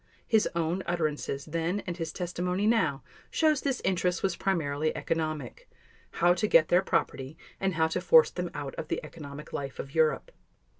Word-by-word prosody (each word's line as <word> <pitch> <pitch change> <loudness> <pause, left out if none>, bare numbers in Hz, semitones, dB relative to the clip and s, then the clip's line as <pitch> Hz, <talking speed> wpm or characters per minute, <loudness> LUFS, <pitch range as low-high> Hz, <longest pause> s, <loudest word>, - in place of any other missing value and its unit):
His 220 -2 +3
own 170 +2 0
utterances 155 -5 -2
then 165 +5 -1
and 175 - -3
his 165 -2 -4
testimony 180 +2 -2
now 165 -12 +2 0.3
shows 310 -3 +2
this 275 -3 -1
interest 180 -1 +1
was 190 -3 +1
primarily 155 -6 0
economic—how 165 - -2
to 215 +4 0
get 160 -5 +5
their 180 - +5
property 135 -5 -1 0.2
and 190 -2 0
how 160 0 +3
to - - -2
force 485 -1 +6
them - - -3
out - - -5
of - - -5
the - - -1
economic 150 -2 -10
life 135 -2 -4
of 135 - -7
Europe. 160 - +2
170 Hz, 165 wpm, -29 LUFS, 155-190 Hz, 0.3 s, force